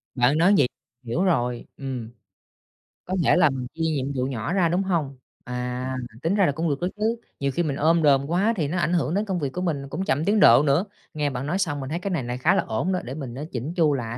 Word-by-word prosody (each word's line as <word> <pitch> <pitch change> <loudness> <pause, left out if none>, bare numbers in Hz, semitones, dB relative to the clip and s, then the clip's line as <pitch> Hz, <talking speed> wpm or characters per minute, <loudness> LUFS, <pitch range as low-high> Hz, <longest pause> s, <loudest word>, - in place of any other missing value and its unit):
Bạn 125 +4 +3
nói 180 +5 +5
vậy 130 - +4 0.4
hiểu 125 +10 -1
rồi. 125 -10 0
Ừm. 130 -5 -5 1.0
Có 185 - -2
thể - - +5
là 150 - +5
mình 130 -2 -4
chia 165 - -7
nhiệm 140 -4 -1
vụ 130 -1 0
nhỏ 130 +3 -3
ra, 180 -4 +3
đúng 180 +3 +1
hông? 155 -8 -1 0.3
À, 125 +1 -3 0.3
tính 170 +5 +1
ra 200 -3 +4
là - - +2
cũng 160 +3 -1
được 140 - -1
đó 180 - +1
chứ, 220 +2 +1 0.2
nhiều 140 0 0
khi 175 +6 0
mình 145 -4 -1
ôm 160 +3 +3
đồm 140 -2 +4
quá 195 +7 +2
thì 150 -4 0
nó 175 - -2
ảnh 170 0 +1
hưởng 155 -3 +1
đến 205 +3 0
công 190 -4 -2
việc 140 -4 -1
của 180 - -3
mình 140 -6 -2
cũng 190 +6 -3
chậm 145 +4 0
tiến 210 +2 +3
độ 120 - +7
nữa. 150 +7 +2 0.3
Nghe 150 -2 0
bạn 130 0 -4
nói 175 +5 0
xong, 145 -6 -1
mình 135 - -5
thấy 170 +3 -2
cái 200 - -3
này 155 -8 -1
này 120 +1 -4
khá 170 +9 +3
là - - +2
ổn 140 +13 -1
đó, 185 - 0
để 125 - -6
mình 135 -5 -6
á 145 - -5
chỉn 135 +7 -4
chu 160 -5 +3
lại 120 -2 -3
145 Hz, 270 wpm, -24 LUFS, 130-175 Hz, 1.0 s, độ